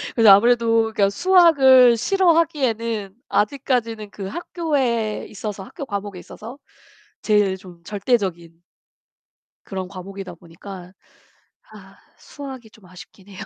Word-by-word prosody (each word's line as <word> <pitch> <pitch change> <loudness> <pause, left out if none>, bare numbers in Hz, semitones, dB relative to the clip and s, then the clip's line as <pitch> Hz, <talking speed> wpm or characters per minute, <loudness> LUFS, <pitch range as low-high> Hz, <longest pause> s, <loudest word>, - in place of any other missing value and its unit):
그래서 225 -3 +5
아무래도 230 +2 +4
그니까 200 -2 +2
수학을 265 - +5
싫어하기에는 265 - 0 0.2
아직까지는 230 -2 -1
그 200 -1 -8
학교에 260 - -2
있어서 205 -1 -6
학교 280 - -9
과목에 200 -3 -5
있어서 230 +8 -11 0.6
제일 205 -3 +1
좀 180 -3 -15
절대적인 190 -5 -2 1.0
그런 190 -2 -5
과목이다 190 -1 -9
보니까 180 +2 -12 0.8
아 - - -15 0.2
수학이 265 -5 -10
좀 215 -4 -20
아쉽긴 185 +2 -15
해요. 195 - -12
215 Hz, 290 characters per minute, -21 LUFS, 195-255 Hz, 1.0 s, 그래서